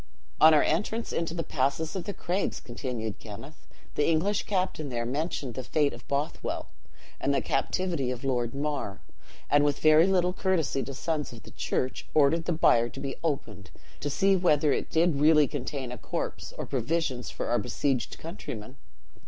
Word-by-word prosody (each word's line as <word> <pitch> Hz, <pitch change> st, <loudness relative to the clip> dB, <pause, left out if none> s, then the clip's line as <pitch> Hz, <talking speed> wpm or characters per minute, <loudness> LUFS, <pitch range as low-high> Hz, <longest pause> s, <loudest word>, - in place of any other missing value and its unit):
"'On 155 Hz, -, +9 dB
our 155 Hz, -, +6 dB
entrance 215 Hz, +8 st, -1 dB
into 165 Hz, 0 st, -1 dB
the 165 Hz, -, -1 dB
passes 150 Hz, +5 st, -1 dB
of 185 Hz, -, -3 dB
the 205 Hz, -, -3 dB
craigs,' 185 Hz, +3 st, -1 dB
continued 120 Hz, -3 st, -5 dB
Kenneth, 125 Hz, +8 st, -11 dB, 0.3 s
'the 150 Hz, -, +2 dB
English 190 Hz, +6 st, +1 dB
captain 185 Hz, -7 st, -1 dB
there 120 Hz, -2 st, -2 dB
mentioned 140 Hz, -1 st, -2 dB
the 130 Hz, -, -5 dB
fate 145 Hz, +3 st, +1 dB
of -, -, -12 dB
Bothwell, 140 Hz, +2 st, -2 dB, 0.5 s
and -, -, +1 dB
the -, -, +3 dB
captivity 165 Hz, -1 st, 0 dB
of 125 Hz, 0 st, -4 dB
Lord 125 Hz, -2 st, 0 dB
Mar; 145 Hz, -8 st, -3 dB, 0.5 s
and 145 Hz, 0 st, +4 dB
with 145 Hz, -1 st, +2 dB
very 155 Hz, +3 st, +6 dB
little 180 Hz, -2 st, +2 dB
courtesy 170 Hz, -8 st, +1 dB
to 135 Hz, -, -6 dB
sons 155 Hz, 0 st, -2 dB
of 110 Hz, -4 st, -12 dB
the -, -, -12 dB
church, 130 Hz, -, -2 dB
ordered 155 Hz, +3 st, +4 dB
the -, -, 0 dB
bier 120 Hz, -7 st, +4 dB
to 135 Hz, -, -9 dB
be 135 Hz, -1 st, -4 dB
opened, 110 Hz, -11 st, -3 dB, 0.3 s
to 145 Hz, -, -2 dB
see 195 Hz, +7 st, +3 dB
whether 150 Hz, -5 st, +3 dB
it -, -, -2 dB
did 160 Hz, -3 st, +2 dB
really 150 Hz, -1 st, +6 dB
contain 130 Hz, -1 st, -4 dB
a 125 Hz, -, -7 dB
corpse, -, -, -4 dB
or -, -, -3 dB
provisions 135 Hz, -1 st, -1 dB
for -, -, -4 dB
our 120 Hz, -, +3 dB
besieged 125 Hz, +1 st, -1 dB
countrymen. 140 Hz, -, -7 dB
145 Hz, 175 wpm, -28 LUFS, 130-165 Hz, 0.5 s, On